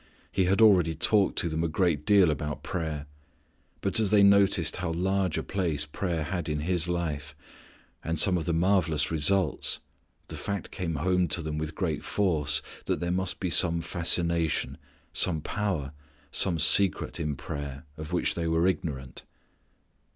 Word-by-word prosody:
He 95 -2 +1
had 100 +5 +3
already 90 -7 +5
talked 100 +5 +2
to - - +1
them 80 0 -2
a - - +1
great 80 -3 0
deal 100 -5 +5
about 75 0 -4
prayer. 80 -4 -4 0.8
But 100 +3 +1
as 110 -3 +2
they 105 -1 +5
noticed 100 -5 +4
how 90 -2 -3
large 95 -1 0
a - - -2
place 85 -7 -1
prayer 85 +1 -3
had 85 0 -4
in 75 -1 -2
His 85 +1 -1
life, 80 -5 -3 0.7
and 80 +1 -2
some 95 0 +4
of 85 -3 -2
the 85 - -1
marvellous 85 -3 +1
results, 90 +5 +1 0.5
the - - -8
fact 100 -1 -4
came 85 -4 -4
home 90 +4 +1
to 85 +1 0
them 75 -1 -3
with 80 0 -5
great - - -2
force 75 -6 0 0.2
that - - -1
there 85 0 -2
must 95 0 -1
be 90 -3 -2
some 85 -1 +3
fascination, 85 -1 0 0.3
some 85 -4 +2
power, 85 -6 -3 0.4
some 90 -4 +4
secret 95 +2 +3
in 75 -3 -2
prayer, 70 +1 -7
of 75 +1 -8
which 90 - +1
_they 85 -1 -2
were 80 +1 +2
ignorant. 75 -8 -3
85 Hz, 165 wpm, -27 LUFS, 75-95 Hz, 0.8 s, already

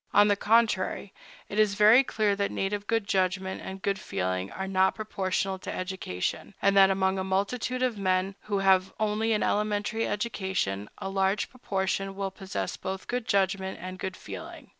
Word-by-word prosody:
On 205 0 +7
the 205 - +4
contrary, 205 -2 +1 0.3
it 205 - -3
is 210 -2 +3
very 215 +5 +7
clear 215 -5 +1
that 200 0 0
native 205 +1 -2
good 225 -2 +1
judgment 190 -2 0
and 190 0 -8
good 200 -1 0
feeling 95 +1 -2
are 190 0 -4
not 190 0 +2
proportional 195 -2 -2
to - - -6
education, 185 - -4
and 200 0 +3
that 195 -1 +7
among 190 0 +1
a - - -1
multitude 225 +7 -1
of 240 -5 0
men 185 0 +1
who 205 -1 -2
have 190 -1 +3
only 215 +1 +1
an 215 - +2
elementary 210 +1 0
education, 190 - -2
a - - -5
large 195 +1 0
proportion 195 -5 -2
will 195 -1 -3
possess 190 -1 -4
both 190 0 -5
good 245 -2 -2
judgment 190 -1 +1
and 185 +1 -7
good 190 -1 -4
feeling. - - -9
195 Hz, 175 wpm, -28 LUFS, 190-210 Hz, 0.3 s, On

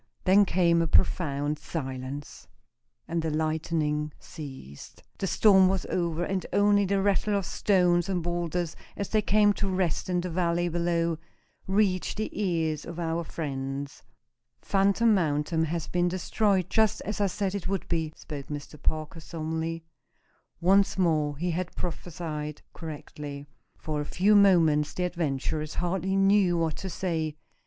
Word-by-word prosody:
Then 200 +2 +6
came 170 -2 +3
a 165 - +1
profound 145 -2 +1
silence, 135 -2 -6 0.6
and 165 0 -1
the 160 - -1
lightning 155 -1 -1
ceased. 130 - -10 0.2
The 195 - -1
storm 190 -1 +6
was 190 -2 -1
over, 170 -1 0
and 190 +1 -1
only 205 0 +4
the 195 0 +1
rattle 205 +1 +2
of 200 -2 0
stones 180 -2 +2
and 180 -3 -1
boulders, 175 -1 -2 0.2
as 200 - -3
they 215 - +2
came 210 0 +4
to 200 -1 -2
rest 185 -1 -1
in 180 -1 +1
the 180 0 -4
valley 175 0 +1
below, 170 -1 0 0.5
reached 190 -1 +1
the 215 - -2
ears 165 -6 -1
of 170 0 -8
our 165 0 -1
friends. 140 -3 -5 0.6
"Phantom 200 +3 +3
Mountain 160 -2 +1
has 165 0 -2
been 175 0 +1
destroyed, 185 +1 +1
just 220 -2 +2
as 210 +1 -3
I 200 - +3
said 195 +1 -2
it 200 -3 -3
would 195 -1 -2
be," 160 -2 -1
spoke 145 -3 -8
Mr. 150 0 -7
Parker, 155 +1 -2
solemnly. 160 +1 -4 0.8
Once 195 +3 +3
more 155 -5 +1
he 175 +3 -1
had 180 +2 -3
prophesied 160 -3 -5
correctly. 145 -3 -7 0.3
For 150 -1 -3
a - - -4
few 200 +7 +3
minutes 165 -7 +4
the 180 - -1
adventurers 155 -3 -2
hardly 190 +2 -1
knew 195 -2 +4
what 165 -2 0
to 190 - -5
say. 160 -5 -2
170 Hz, 150 wpm, -27 LUFS, 155-190 Hz, 0.8 s, Then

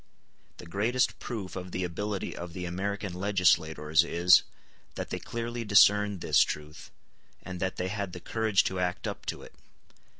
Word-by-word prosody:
The - - -11
greatest 110 +9 0
proof 105 -6 -6
of 90 -1 -6
the 90 - -2
ability 100 +3 -3
of 85 -1 -7
the 90 0 -5
American 95 +2 -3
legislators 85 -5 +2
is, 85 +1 +5 0.5
that - - -5
they - - -2
clearly 120 0 -4
discerned 105 -2 +4
this - - +4
truth, 75 +1 -3 0.5
and 90 -1 -7
that 95 0 -2
they 90 - -2
had 100 -2 -3
the 90 - -6
courage 110 0 +1
to 95 - -2
act 90 0 -2
up - - -6
to - - -4
it. - - -13
95 Hz, 165 wpm, -29 LUFS, 90-105 Hz, 0.5 s, is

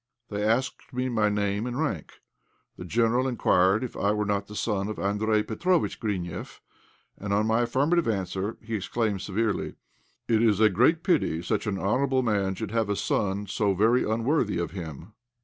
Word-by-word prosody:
They 105 0 -3
asked 120 +5 0
me 125 +1 -2
my 110 -3 +2
name 105 +2 -1
and 125 +2 -3
rank. 110 - -3 0.5
The 90 - -8
General 115 +6 +2
inquired 100 -3 +3
if 125 - -5
I 100 - +1
were 105 0 -1
not 100 -1 -1
the 105 - -10
son 105 -2 -1
of 110 - -4
Andréj 105 +2 +1
Petróvitch 170 +11 0
Grineff, 95 -7 -4 0.6
and 100 0 -4
on 105 +2 +2
my 110 +2 +2
affirmative 140 +8 +1
answer, 100 0 -2
he 115 +1 -6
exclaimed, 105 0 -1
severely 105 +1 -1 0.5
"It 110 -1 +3
is 110 -4 +3
a 110 -1 +6
great 130 - +3
pity 115 - +1
such 90 - -1
an 100 -2 -1
honourable 130 +7 +1
man 100 -4 0
should 110 0 -5
have 115 -2 0
a 100 - +1
son 100 0 -1
so 100 0 0
very 115 +6 +3
unworthy 115 - 0
of 85 0 -2
him!" 85 +1 -8
105 Hz, 180 wpm, -27 LUFS, 100-120 Hz, 0.6 s, a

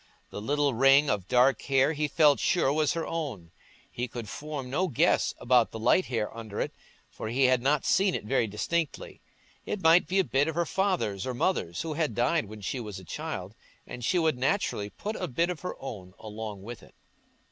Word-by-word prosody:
The 105 - -6
little 145 +4 +1
ring 135 +4 +5
of 100 -3 -2
dark 125 +4 +4
hair 135 +2 +2
he 150 0 -1
felt 145 -4 +4
sure 150 -6 +2
was 155 -1 +1
her 165 -1 -2
own; 130 - -5 0.4
he 125 +1 -3
could 120 -2 -7
form 145 +2 -6
no 155 +9 0
guess 130 - +2
about 120 -1 +3
the - - -7
light 150 +11 +3
hair 115 -3 -2
under 110 -3 -7
it, - - -2 0.4
for - - -6
he 125 +5 +1
had 130 -1 +4
not 140 +2 +1
seen 195 -1 +3
it 110 - -4
very 120 -1 +1
distinctly. 150 +10 -3 0.4
It 200 - -4
might 165 +2 +6
be 190 - 0
a 190 - +5
bit 140 -3 +1
of 160 - -3
her 170 0 +1
father's 180 - -1
or 130 - -3
mother's, 105 - -1
who 160 -1 -3
had 155 -1 -1
died 125 +3 +1
when 105 +1 -10
she 125 +6 -3
was 105 -5 -6
a 95 - -11
child, 90 +3 -5 0.3
and 120 - -8
she 180 - +1
would 160 -6 +1
naturally 130 - 0
put 210 - -5
a - - -3
bit 170 +8 0
of 175 - -6
her 180 - -5
own 95 -8 -8
along 105 -2 -7
with 120 +2 -8
it. - - -18
135 Hz, 210 wpm, -28 LUFS, 110-160 Hz, 0.4 s, might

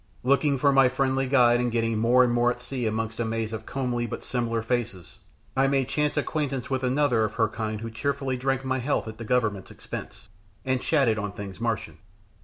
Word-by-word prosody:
Looking 140 +2 +3
for 140 +2 +3
my 135 -2 +5
friendly 130 0 0
guide 120 -3 +5
and 120 -1 0
getting 115 -1 0
more 120 +3 +5
and 120 -1 +2
more 120 0 +3
at 120 0 -3
sea 125 -1 -3
amongst 110 +1 -3
a - - +1
maze 115 0 -2
of 110 0 -6
comely 125 -3 -2
but - - -6
similar 115 -2 -1
faces, 115 -7 -3 0.4
I 135 +1 +3
made 135 -1 +1
chance 150 +1 0
acquaintance 140 -3 -2
with 130 0 0
another 130 -3 +2
of 110 -1 -2
her 115 -1 +3
kind 110 -1 -4
who 115 0 -5
cheerfully 135 +2 -2
drank 135 +1 -1
my 130 0 0
health 130 -1 -1
at 110 +1 -8
the - - -5
Government's 105 -5 0
expense, - - -8 0.4
and 130 -1 0
chatted 130 -8 +2
on 100 -1 -4
things 100 0 -8
Martian. 105 -9 -2
125 Hz, 210 wpm, -26 LUFS, 115-135 Hz, 0.4 s, my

